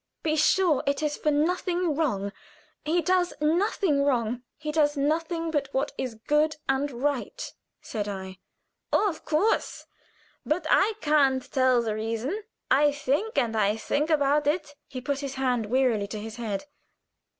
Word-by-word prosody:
"Be 310 -1 +1
sure 320 0 +3
it 280 +2 0
is 295 -1 0
for 305 - 0
nothing 345 +3 +1
wrong. 205 -11 -1 0.5
He 335 +3 +1
does 360 +1 +2
nothing 325 -1 +2
wrong. 245 -3 0 0.2
He 305 -1 -4
does 295 -1 +2
nothing 330 +3 0
but 285 -3 -1
what 270 +2 0
is 250 -3 -4
good 300 +7 +1
and 270 +2 +1
right," 285 - -3 0.3
said 210 -4 -4
I. 190 -2 -6 0.5
"Oh, 425 - +3
of 330 -6 -4
course! 320 +8 0 0.6
But 315 +1 -1
I 420 +3 +4
can't 275 -4 +3
tell 255 -3 +3
the 220 -2 -1
reason. 230 - -3 0.3
I 290 +3 +5
think 290 - -1
and 225 -2 +1 0.2
think 295 +7 0
about 295 -1 +2
it." 295 -1 0
He 255 - -7
put 280 +2 -2
his 275 -1 -5
hand 250 -4 0
wearily 235 -4 +2
to 210 +1 -5
his 220 +2 -7
head. 220 +1 -3
290 Hz, 155 wpm, -27 LUFS, 250-315 Hz, 0.6 s, I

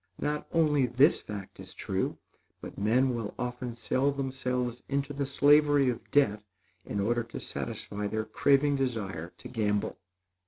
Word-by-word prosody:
Not 150 0 -2
only 150 -5 +3
this 130 +5 +4
fact 100 -2 -8
is - - -10
true, - - -2 0.4
but - - -9
men 125 +6 +2
will 115 -3 -4
often 125 -1 -4
sell 130 +4 +1
themselves 125 -3 -2
into 140 +1 -1
the 140 -1 -2
slavery 145 -1 +5
of 120 - -9
debt 105 -8 +3 0.4
in 100 - -4
order 120 +4 +1
to 115 - -7
satisfy 105 0 -4
their 110 +1 -2
craving 140 +2 +3
desire 100 -11 -3
to - - -10
gamble. 105 -3 -1
125 Hz, 150 wpm, -29 LUFS, 110-140 Hz, 0.4 s, slavery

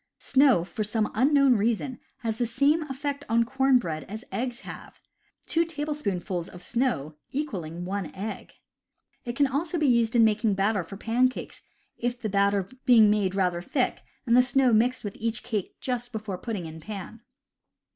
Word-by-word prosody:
Snow, 265 -10 +4
for 215 +4 -4
some 215 0 -1
unknown 275 +1 +4
reason, 235 +4 -1 0.2
has 225 -1 -2
the 240 - +1
same 280 +7 +2
effect 280 +1 -3
on 230 +1 +4
corn 265 +2 +3
bread 160 -9 -3
as 215 +4 -8
eggs 245 0 -3
have, - - -10 0.5
two 335 0 +2
tablespoonfuls 285 - -3
of 180 - -11
snow 230 - -1 0.2
equaling 180 - -4
one 195 -2 -3
egg. 210 +3 -6 0.7
It 240 0 -4
can 285 +2 +4
also 300 +6 -1
be 310 - +1
used 235 -3 +3
in 235 - +6
making 215 -1 +2
batter 200 0 +1
for 195 +4 -9
pancakes, 250 +4 0 0.4
the 240 -2 -2
batter 200 -1 +2 0.2
being 225 -4 +6
made 200 -3 +1
rather 180 -3 +1
thick, 250 +8 -1 0.2
and 235 -1 +3
the 250 - +8
snow 255 -1 +3
mixed 245 +4 +2
with 205 -2 -5
each 225 0 -1
cake 210 -5 -3
just 245 -1 -3
before 210 -5 -5
putting 205 -5 -4
in 160 0 -8
the - - -16
pan. 210 +1 -7
230 Hz, 170 wpm, -27 LUFS, 200-255 Hz, 0.7 s, the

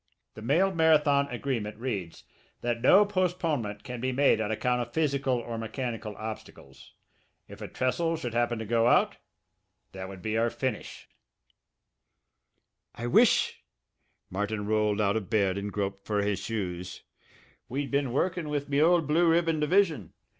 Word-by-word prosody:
The 110 - -10
mail 170 - +2
marathon 150 -4 +4
agreement 120 -5 -3
reads 105 -9 -5 0.4
that 120 -1 -2
no 200 - +6
postponement 165 - -1
can 125 -2 -6
be 130 +1 0
made 135 -3 +3
on 105 - -2
account 125 +3 0
of 120 0 -6
physical 140 -4 +1
or 115 -1 -5
mechanical 115 -1 -4
obstacles. 110 0 -9 0.5
If - - -12
a - - -5
trestle 165 +6 -1
should 120 -7 -5
happen 120 0 +1
to 110 - -5
go 115 +1 +2
out - - +3 0.7
that 95 0 -7
would 95 -2 -10
be 110 0 0
our 115 +1 +2
finish." 130 -2 -5 1.9
"I 120 - -5
wish" 120 - +3 0.7
Martin 105 +2 -2
rolled 105 0 +1
out 100 -1 +2
of 105 -3 -5
bed 100 -4 +2
and 100 +1 -4
groped 100 -1 -3
for 105 -1 0
his 100 -2 -1
shoes 90 -4 -5 0.7
"we'd 135 +2 -3
been 140 -2 0
workin' 165 +3 -1
with 145 -1 -3
me 140 +1 +2
old 170 0 +4
Blue 165 +4 +3
Ribbon 165 -1 +2
division. 155 - +1
120 Hz, 155 wpm, -28 LUFS, 105-150 Hz, 1.9 s, no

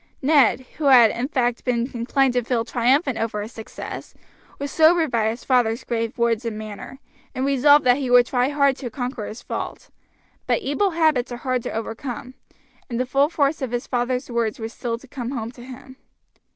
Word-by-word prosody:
Ned, 275 -4 +4 0.2
who 305 - -2
had 245 -5 +7
in 245 +2 -3
fact 245 -5 -1
been 245 0 -1
inclined 255 +2 +1
to 245 - +1
feel 230 -1 -1
triumphant 255 +3 +1
over 220 -2 -2
his 220 - -8
success, 220 -2 -8 0.4
was 280 0 -5
sobered 320 -2 +4
by 220 -2 +1
his 230 +2 -5
father's 245 -2 +1
grave 230 +1 -3
words 235 -1 +1
and 230 -2 -4
manner; 215 +4 -8 0.4
and 260 - -1
resolved 280 +1 +5
that 250 0 +5
he 270 -3 -3
would 245 0 +6
try 250 +1 +1
hard 280 -2 +2
to 250 - -5
conquer 245 -1 -4
his 220 - -9
fault; - - -6 0.6
but 470 - +1
evil 390 +9 +1
habits 315 -8 +1
are 240 - -4
hard 255 0 -1
to - - -5
overcome, 230 +3 -5 0.6
and 235 -1 -3
the 255 - +1
full 275 +3 +2
force 295 -2 0
of 260 - -2
his 245 0 -3
father's 250 0 -1
words 235 -3 -1
was 225 0 -6
still 230 -1 -3
to 270 - -16
come 250 -3 -5
home 235 -4 -4
to 245 - -14
him. 260 +1 -12
250 Hz, 200 wpm, -22 LUFS, 235-275 Hz, 0.6 s, had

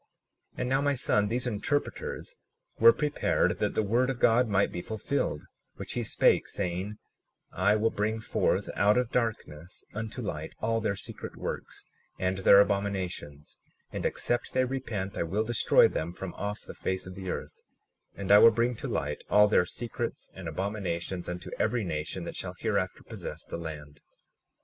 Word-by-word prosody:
37:24 - - -10
And 125 - -1
now, 135 +1 +2
my 145 0 +2
son, 105 -4 +2
these 120 +4 -1
interpreters 125 +5 -2 0.4
were 115 +1 +9
prepared 150 +4 +1
that - - 0
the 110 - +2
word 120 +5 +2
of 130 -2 -2
God 120 +2 +4
might 100 -1 +2
be 90 - -4
fulfilled, 110 - -2 0.3
which - - -6
he - - -1
spake, - - +3
saying: 95 +2 -3 0.6
37:25 - - -10
I 105 - +4
will 110 +1 +2
bring 110 +2 -1
forth 110 - 0
out 105 +2 +4
of 125 -2 +1
darkness 95 -8 -3
unto 115 +3 -5
light 80 -6 -5
all 115 +1 0
their 105 -2 0
secret - - -7
works - - -5 0.3
and 95 0 -1
their 100 +1 +8
abominations; 95 -7 -2 0.3
and - - -4
except 120 - -1
they 130 0 +3
repent 115 -7 -3
I - - +1
will 95 +6 0
destroy 120 0 +5
them 80 +2 -3
from 95 0 -6
off 105 0 -4
the - - -9
face 95 0 -2
of 90 - -8
the 95 0 -6
earth; - - -5 0.5
and 100 -1 -2
I 105 - +10
will 115 - +10
bring 115 +2 +1
to - - -5
light 75 +1 -2
all 105 0 +6
their 90 -4 +3
secrets 120 +1 -4
and 95 -2 -8
abominations, 90 0 -3
unto 90 0 -6
every 115 +1 +1
nation 75 -4 -3
that - - -6
shall - - -5
hereafter - - -1
possess - - -7
the - - -5
land. 75 -3 -8
105 Hz, 180 wpm, -29 LUFS, 90-115 Hz, 0.6 s, I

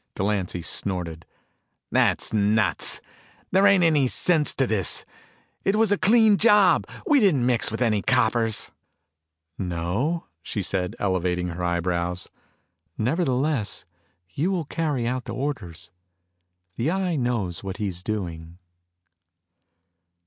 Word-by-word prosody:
Delancy 95 -3 -2
snorted. 85 -4 -2 0.6
"That's - - +1
nuts. 105 +1 +2 0.5
There 195 +2 +5
ain't 200 -3 +4
any 150 -5 +3
sense 155 +3 +3
to 135 - +1
this. 105 -6 +1 0.6
It 195 - +1
was 220 -1 +2
a - - +5
clean 220 +1 +5
job. 210 -4 +4 0.2
We 295 -2 +4
didn't 165 - +3
mix 120 -3 +2
with 110 +3 -2
any 110 -3 +1
coppers." 115 -2 +1 0.9
"No?" 95 - -2 0.2
she 105 - -4
said, 90 -1 -2
elevating 90 -2 -1
her 85 +1 -5
eyebrows. 85 0 -1 0.7
"Nevertheless, 130 - -1 0.5
you 160 - 0
will 180 -5 -1
carry 145 -5 -2
out 125 +1 -2
the - - -6
orders. 95 - -5 0.9
The 120 +6 0
Eye 185 -1 -1
knows 115 - -2
what 95 -1 -5
he's 95 -5 -3
doing." 85 -5 -5
115 Hz, 120 wpm, -24 LUFS, -, 0.9 s, There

